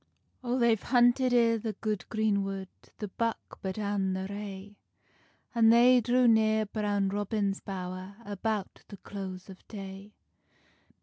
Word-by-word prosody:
O 245 0 0
they've 235 -4 +3
hunted 245 +1 +3
i 230 -2 +4
the 220 0 -4
good 210 -2 -4
green 215 -3 +1
wood 195 -1 -5 0.3
The 210 - -5
buck 230 +3 -3
but 190 0 -4
an 200 -2 -1
the 190 0 -3
rae, 200 0 -8 0.7
An 230 -2 +5
they 245 +2 +6
drew 245 +2 +3
near 220 -1 +4
Brown 205 -2 -1
Robin's 205 0 -1
bowr, 185 0 -6
About 205 0 -3
the 200 - -10
close 190 -2 -7
of 190 -2 -12
day. 195 0 -9
205 Hz, 140 wpm, -29 LUFS, 195-230 Hz, 0.7 s, they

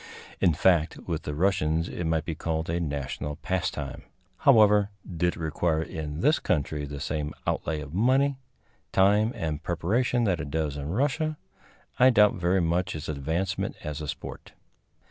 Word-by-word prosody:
In 85 -5 +3
fact, 85 -1 +3
with 85 -2 -2
the 75 - -5
Russians 80 -2 +1
it 85 - -4
might 80 -1 0
be 85 - -2
called 80 +1 -2
a 85 - 0
national 75 -1 -3
pastime. 80 -6 -3 0.4
However, 105 -5 +5 0.2
did 85 0 0
it - - -11
require 80 0 0
in 75 -1 -5
this 150 +3 +4
country 75 -3 -1
the 70 0 -7
same 75 +1 -3
outlay 75 -1 -1
of 75 0 -9
money, 130 +7 +2 0.5
time 105 +4 +4
and 75 -2 -3
preparation 110 +9 0
that 95 -6 +1
it 75 -2 -4
does 75 -1 -1
in 70 0 -5
Russia, 150 - 0 0.6
I 130 +1 +8
doubt 105 -4 +5
very 90 +1 +1
much 85 +2 0
its 75 0 -6
advancement 80 +7 -2
as 75 0 -4
a 75 - -5
sport. - - -7
85 Hz, 165 wpm, -27 LUFS, 75-100 Hz, 0.6 s, I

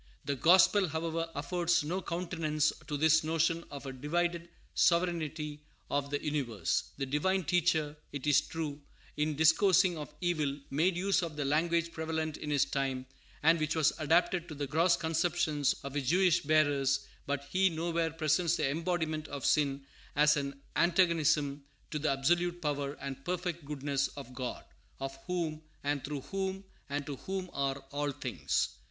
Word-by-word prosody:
The 140 - 0
gospel, 185 - +5
however, 165 +1 -2
affords 175 +3 +1
no 180 +6 -2
countenance 165 -4 0
to 150 - -2
this 160 +2 +4
notion 165 +1 +1
of 140 0 -8
a 135 - -5
divided 170 +5 -1 0.2
sovereignty 160 -4 +1 0.3
of 140 0 0
the 145 0 -1
universe. 120 - -1
The 135 - -1
Divine 180 +8 +1
Teacher, 160 -3 +1 0.2
it 145 -1 -5
is 145 -1 +5
true, 150 -3 -5 0.3
in 150 0 0
discoursing 170 +2 +4
of 150 - -7
evil, 155 -6 0
made 170 +6 +2
use 195 +1 +2
of 165 -3 -4
the 145 -1 -2
language 170 +3 +1
prevalent 160 -1 -3
in 150 - -6
His 145 -3 +3
time, 135 -2 -2 0.4
and 165 +2 +5
which 155 +1 0
was 160 -3 +3
adapted 170 +3 +2
to 155 - -7
the 145 0 -2
gross 165 +5 +3
conceptions 160 -3 +1
of 140 -1 -6
His 140 -3 -1
Jewish 180 0 +4
bearers; 145 -3 +2 0.2
but 140 0 -1
He 190 +1 +4
nowhere 165 0 -1
presents 160 +1 +1
the - - +1
embodiment 160 -1 -1
of 140 -2 -5
sin 140 -2 +2 0.3
as 150 +1 +5
an 140 -1 -3 0.2
antagonism 165 -5 +2 0.3
to 155 - -2
the 155 - 0
absolute 175 +6 +1
power 145 -3 -2
and 135 -1 -7
perfect 175 -1 -3
goodness 140 -1 -1
of 130 -3 -8
God, 125 0 -5 0.3
of 135 0 -4
whom, 165 -4 -2 0.2
and 145 -1 -1
through 145 -1 -4
whom, 190 +3 -3 0.3
and 145 0 -2
to 145 -3 -5
whom 190 +2 -4
are 135 -1 0
all 145 0 -1
things. 125 - -1
155 Hz, 160 wpm, -31 LUFS, 145-170 Hz, 0.4 s, gospel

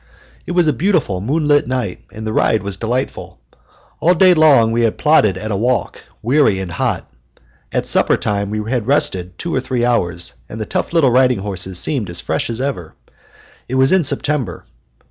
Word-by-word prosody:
It - - -3
was 175 -1 +3
a 150 - +3
beautiful 160 - 0
moonlight 145 +3 +1
night, 125 -8 -3
and 110 +1 -8
the 110 - -3
ride 110 -1 +1
was 100 -1 -4
delightful. 120 +6 -4 0.6
All 175 +2 +3
day 185 +1 +6
long 145 -9 +5
we 115 +1 +1
had 115 -2 +1
plodded 110 - +3
at 110 +3 -5
a - - 0
walk, 120 +4 -1 0.2
weary 130 -4 +3
and 95 -2 -5
hot. - - -2 0.6
At - - -1
supper - - +3
time 100 -1 -2
we 105 0 -4
had 120 -4 -1
rested 90 -10 0
two 170 - -4
or - - +1
three 125 -2 -1
hours, 90 -8 0 0.2
and 110 - -7
the 110 - -3
tough - - -3
little 160 -7 +3
riding 125 -1 +3
horses 95 -2 -4
seemed 120 - 0
as 85 0 -2
fresh 80 - -2
as 115 0 -3
ever. 125 - -4 0.7
It 130 - -4
was 130 0 +4
in 190 -2 +4
September. 140 - -2
120 Hz, 190 wpm, -17 LUFS, 100-145 Hz, 0.7 s, day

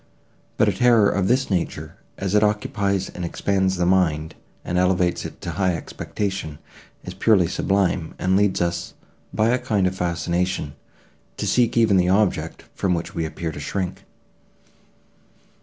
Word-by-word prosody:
But - - +4
a - - +2
terror 115 -4 +4
of 95 -2 0
this 130 0 +1
nature, 90 -3 -2 0.2
as 95 -1 -3
it 105 - +5
occupies 100 -2 0
and 90 - -7
expands 95 +2 0
the 90 -1 0
mind, 80 -4 +1 0.3
and 90 - 0
elevates 90 -1 +1
it - - -8
to 85 - -4
high 90 +1 0
expectation, 95 -2 -4 0.5
is - - -7
purely 105 -6 +3
sublime, 95 -2 0
and 95 +1 +1
leads 100 -2 +2
us, 85 -1 -2 0.4
by 110 +1 +2
a 125 +2 +2
kind 100 -5 0
of 90 0 0
fascination, 85 -2 -1 0.6
to - - -3
seek 120 -1 +2
even 110 -4 +4
the 90 0 +3
object, 100 0 0
from 90 -2 0
which 85 +4 -5
we 85 -4 -2
appear 80 +1 -4
to 75 - -8
shrink. 90 +5 -3
95 Hz, 155 wpm, -22 LUFS, 85-100 Hz, 0.6 s, it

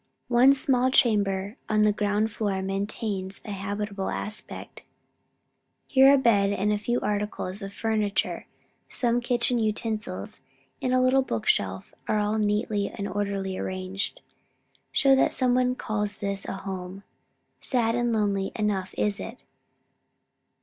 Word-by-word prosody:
One 255 +3 +6
small 260 -1 +3
chamber, 205 -3 +2
on 215 0 +3
the 210 - +5
ground 210 +1 0
floor, 200 -3 -1
maintains 195 0 -3
a 210 - -5
habitable 200 0 -3
aspect. 210 0 -6 1.0
Here 270 0 +6
a 280 - +6
bed 210 -6 +3
and 205 +1 +1
a 210 - -1
few 240 +4 0
articles 205 -1 -2
of 195 0 -6
furniture, 215 -1 -1 0.4
some 240 -1 +1
kitchen 240 0 +1
utensils 215 - -3 0.4
and 255 - 0
a 255 - +4
little 255 +1 +4
bookshelf, 100 - -1 0.2
all 210 0 +1
neatly 210 -1 0
and 200 - -5
orderly 200 -1 -2
arranged, 185 +1 -4 0.7
show 275 -1 +5
that 265 - +3
some 250 -2 +2
one 250 0 +2
calls 210 -3 -2
this 200 -1 -3
a - - -4
home! 190 0 -6 0.6
Sad 235 -3 0
and 240 0 +1
lonely 200 -3 0
enough 200 -3 -1
is 205 -1 0
it! 230 +3 -8
210 Hz, 135 wpm, -26 LUFS, 195-235 Hz, 1.0 s, One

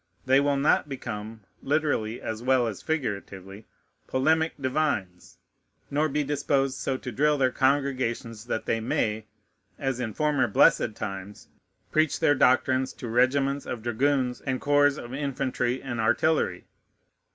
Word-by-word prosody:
They 130 +1 +5
will 140 0 +1
not 145 +1 +2
become, 110 -4 -6 0.2
literally 140 -6 0
as 110 0 -5
well 130 0 +3
as 110 -4 -4
figuratively, 100 - -4 0.4
polemic 160 +5 +2
divines, 130 -10 -2 0.5
nor 150 +2 +1
be 150 +1 0
disposed 135 -2 0
so 135 - -1
to 125 - -7
drill 150 +5 +2
their 130 -2 +2
congregations, 130 -5 0
that 115 - -3
they 115 - 0
may, 110 -1 -1 0.5
as 135 -2 -2
in 110 -4 -4
former 150 -5 +1
blessed 110 +1 +3
times, 100 -1 -7 0.4
preach 155 -1 +2
their 145 - +4
doctrines 130 -1 +2
to 125 - -8
regiments 135 +4 +1
of 115 -3 -5
dragoons 125 +1 0
and 130 -2 -2
corps 145 0 +3
of 120 -2 -8
infantry 130 -3 -2
and 120 -4 -4
artillery. 160 +8 +1
130 Hz, 140 wpm, -26 LUFS, 115-145 Hz, 0.5 s, They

